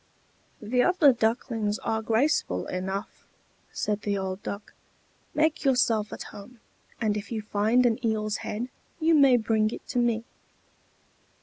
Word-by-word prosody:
"The 245 +4 +2
other 320 -4 +5
ducklings 225 -2 0
are 220 0 -2
graceful 225 - +1
enough," 190 +3 -4 0.5
said 210 0 -2
the 200 -1 -1
old 190 0 -4
Duck. 200 +1 -7 0.6
"Make 310 +1 +1
yourself 235 -6 +2
at - - -6
home; 225 +4 -12 0.4
and 215 -3 +1
if 205 +1 -6
you 220 -2 -3
find 220 +4 +2
an 240 +1 +1
eel's 215 -2 0
head, 235 +4 -4 0.3
you 325 0 +3
may 275 -5 +6
bring 220 -1 +1
it - - -8
to 245 - 0
me." 235 -2 +1
220 Hz, 140 wpm, -27 LUFS, 210-250 Hz, 0.6 s, may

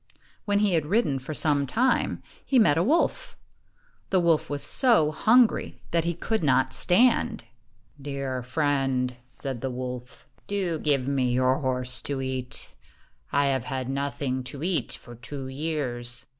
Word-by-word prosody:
When 205 -1 +2
he 205 -3 +2
had 160 -3 +1
ridden 160 - +1
for 135 +4 -6
some 145 -2 +2
time, 250 - +1 0.2
he 270 - +1
met 215 -11 +5
a 165 - +2
wolf. 335 - 0 0.7
The 190 - +3
wolf 170 -3 +2
was 145 -1 -2
so 230 - +4
hungry 225 +9 +3
that 170 -1 +1
he 170 0 -1
could 220 +2 -2
not 130 -2 +2
stand. 230 - +3 0.6
"Dear 135 -2 -3
friend," 135 -2 0
said 125 -1 -6
the 135 - -2
wolf, 125 0 -7 0.2
"do 185 -5 -1
give 140 -4 +1
me 130 -3 +1
your 130 +1 +2
horse 125 -2 -2
to 140 -2 -3
eat. 130 -1 -3 0.6
I 140 0 +3
have 130 -2 -2
had 130 -1 -3
nothing 135 -1 -2
to 140 +3 -7
eat 180 -1 0
for 120 - -10
two 130 +3 -7
years. 130 -5 -4
140 Hz, 155 wpm, -26 LUFS, 130-170 Hz, 0.7 s, met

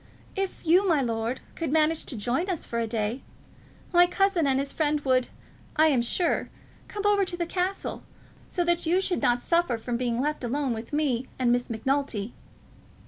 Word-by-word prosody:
"If 390 -2 -3
you, 360 +5 +5
my 320 -4 +4
lord, 230 0 -2
could 330 -5 -3
manage 315 +1 +2
to 250 - -3
join 250 - -1
us 355 -4 -2
for 235 - -3
a 230 - -1
day, 220 +3 -2 0.7
my 350 0 +7
cousin 370 -4 +2
and 265 -1 +2
his 275 +1 -2
friend 300 -1 +1
would, 255 -2 +2 0.5
I 315 +1 +5
am 265 -5 +3
sure, 335 +9 0 0.4
come 410 -1 -5
over 410 -1 +4
to 360 -2 -4
the 345 - -1
castle, 365 +3 -2 0.5
so 355 - 0
that 345 -1 +1
you 355 +3 +3
should 380 -2 -1
not 245 0 +2
suffer 335 -8 +2
from 235 +1 -3
being 240 -1 -1
left 300 +1 -1
alone 265 +1 -1
with 225 +1 -7
me 275 -5 0
and 250 -2 +2
Miss 245 +1 +1
Macnulty." 240 -2 -1
285 Hz, 190 wpm, -27 LUFS, 240-345 Hz, 0.7 s, my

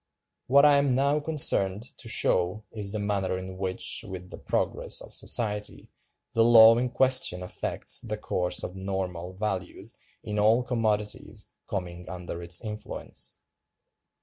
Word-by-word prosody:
What 140 +3 +6
I 145 -1 +6
am 140 -3 +2
now 140 +3 +2
concerned 140 -10 +3
to 115 - -5
show 95 -1 +1
is 105 -3 -2
the 110 - -2
manner 100 -3 -1
in 95 0 -8
which, 95 +5 -1
with 90 -2 -9
the - - -8
progress - - -1
of - - -11
society, 105 -3 0 0.4
the 115 - +3
law 115 -1 +8
in 125 0 -1
question 130 -9 +4
affects 90 - 0
the 110 -2 -5
course 90 -4 -2
of - - -4
normal(297) 95 -2 -5
values 95 +1 -4 0.3
in 105 -1 -3
all 110 +4 +3
commodities 110 -4 -2 0.2
coming 90 -2 -5
under 90 -1 -7
its 85 +5 0
influence. 105 -1 -6
105 Hz, 145 wpm, -27 LUFS, 95-115 Hz, 0.4 s, law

